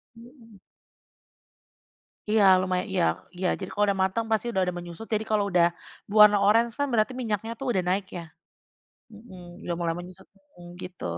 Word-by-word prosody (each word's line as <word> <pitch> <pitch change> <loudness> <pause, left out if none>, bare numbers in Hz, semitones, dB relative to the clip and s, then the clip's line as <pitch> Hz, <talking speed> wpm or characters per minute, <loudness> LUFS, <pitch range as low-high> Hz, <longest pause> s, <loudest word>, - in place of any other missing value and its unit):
Mhm. 230 -3 -17 1.7
Iya, 215 0 +3 0.2
lumaya 185 -1 -1
iya 185 -2 +1 0.3
iya. 185 0 -1
Jadi - - -6
kalau 205 - +1
udah 195 -1 0
mateng, 190 +5 -1
pasti 220 +1 +1
udah 190 - 0
ada 180 - -2
menyusut. 175 +5 -8
Jadi 215 0 +1
kalau 215 -1 +2
udah, 175 -1 +4 0.4
berwarna 210 0 +7
oranye 230 +3 +4
kan, 285 - +1
berarti 220 +1 +1
minyaknya 220 0 -3
tuh 270 - -5
udah 185 -4 0
naik, 195 +2 0
ya. 170 - -6 0.9
Mhm, 185 -5 -13
udah 175 - -1
mulai 170 -1 -1
menyusut, 180 0 -11 0.3
mhm, 175 0 -12
gitu, 180 -1 -9
200 Hz, 165 wpm, -26 LUFS, 180-220 Hz, 1.7 s, berwarna